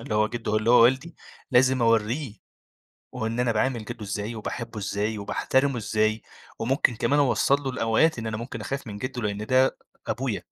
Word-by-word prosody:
اللي 115 - -4
هُو 110 0 +3
جده 115 -2 -2
اللي 110 +2 +1
هُو 125 - +7
والدي 130 +8 +2 0.4
لازم 130 0 +4
أوريه، 115 +2 +1 0.8
وهُو 125 -3 -4
إن 115 +2 -2
أنا 125 -1 +2
باعامل 115 0 0
جده 120 -2 -7
إزاي 105 +3 -4
وباحبه 115 +1 -5
إزاي، 105 +2 -2
وباحترمه 130 +6 0
إزاي، 110 0 0 0.4
وممكن 125 0 +1
كمان 145 +6 +1
أوصل 140 0 +3
له 135 - -2
الأوقات 125 +4 +2
إن 115 - -4
أنا 110 0 -3
ممكن 115 -1 -6
أخاف 135 +3 -4
من 105 -1 -6
جده 130 +1 -4
لأن 105 0 -3
ده 130 +2 +3 0.3
أبويا، - - -2
115 Hz, 180 wpm, -25 LUFS, 110-130 Hz, 0.8 s, هُو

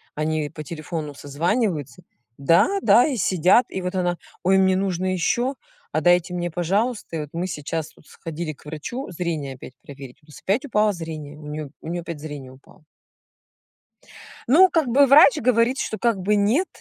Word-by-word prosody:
Они 155 -1 -1
по 155 -1 -8
телефону 155 -1 -6
созваниваются: 170 - -2 0.3
"Да, 155 +5 +4
да". 230 +7 +5
И 265 -5 -2
сидят, 185 +5 +3
и 190 - -4
вот 180 +1 -4
она: 175 -1 0 0.3
"Ой, 190 +2 +4
мне 190 -1 +3
нужно 185 -1 -1
ещё, 240 +9 0 0.4
а - - 0
дайте 175 0 +3
мне, 175 -1 -3
пожалуйста". 195 +4 -1
И - - -3
вот 150 - -7
мы 175 +2 -2
сейчас 155 0 -5
вот - - -22
сходили 160 -1 -6
к 145 - -22
врачу 160 - -6
зрение 160 -6 -4
опять 130 - -12
проверить, 135 -3 -11
у - - -27
нас 150 - -13
опять 230 +10 0
упало 210 -4 +2
зрение, 155 -3 -7
у 150 - -11
неё 150 -1 -6
у - - -10
неё 175 0 -3
опять 165 -3 -7
зрение 145 -4 -8
упало. 135 +3 -20 1.6
Ну, 360 +9 +6
как 320 -6 +1
бы, 275 +4 +5
врач 275 0 +7
говорит, 245 +2 +2
что 220 - -3
как 230 -1 +1
бы 205 +3 +1
нет, 225 - +2
175 Hz, 180 wpm, -23 LUFS, 155-215 Hz, 1.6 s, врач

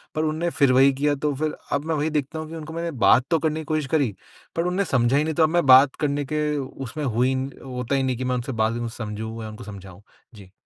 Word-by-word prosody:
पर 155 - 0
उनने 160 +2 -1
फ़िर 140 -5 +3
वही 135 +1 +5
किया 145 +2 +1
तो 145 +1 -1
फ़िर 155 +2 -2 0.2
अब 140 +1 -1
मैं 160 0 0
वही 150 +1 0
देखता 150 +1 -2
हूँ 155 0 -6
कि 165 - -7
उनको 160 0 -7
मैंने 170 0 -3
बात 125 +1 +5
तो 165 - +3
करने 155 0 -1
की 160 - -7
कोशिश 155 -1 -1
करी 135 -9 +1 0.4
पर 165 - +1
उनने 185 +3 0
समझा 125 -2 +2
ही 145 - +3
नहीं 160 +1 -2
तो 160 - +3
अब 155 - +4
मैं 175 -1 +1
बात 130 +1 +7
करने 145 -1 0
के 150 0 +1
उसमें 135 +1 -6
हूँ 120 0 +1
ही 130 - +2 0.3
होता 125 0 -3
ही 135 - +1
नहीं 130 -2 -1
कि 130 - -4
मैं 125 0 0
उनसे 125 +2 -3
बात 115 +2 0
को 120 - -3
समझूँ 110 +1 -5
या 110 - -6
उनको 110 +2 -10
समझाऊँ। 100 -2 -11 0.3
जी। 100 -3 -14
140 Hz, 270 wpm, -24 LUFS, 125-155 Hz, 0.4 s, बात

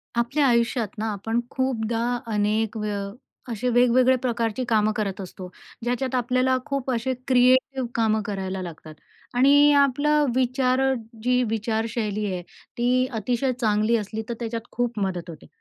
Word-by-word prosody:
आपल्या 260 +5 +1
आयुष्यात 235 -1 +2
ना, 220 +1 -2
आपण 225 +4 -2
खूपदा 240 -2 -1 0.2
अनेक 210 +2 0
वे 210 -1 -2 0.6
असे, 235 +2 -1
वेगवेगळ्या 250 +1 +4
प्रकारची 235 -1 -1
कामं 215 -1 +3
करत 200 -3 -2
असतो, 185 0 -9 0.3
ज्याच्यात 250 +2 -1
आपल्याला 255 +1 +2
खूप 275 -2 -3
असे, 245 +2 -1
क्रिएटिव 260 +1 +3
कामं 220 -1 +2
करायला 190 -3 -3
लागतात 160 -3 -9 0.4
आणि 285 +3 +6
आपलं 290 +2 +3
विचार, 255 0 +1 0.4
जी 250 +1 +3
विचारशैली 220 -1 -2
आहे, 180 - -3 0.4
ती 250 +2 +2
अतिशय 240 +4 0
चांगली 215 +1 +2
असली 215 +1 -4
तर - - -1
त्याच्यात 230 0 -4
खूप 240 -2 -2
मदत 185 -3 -2
होते. 160 -3 -11
235 Hz, 140 wpm, -24 LUFS, 215-255 Hz, 0.6 s, आणि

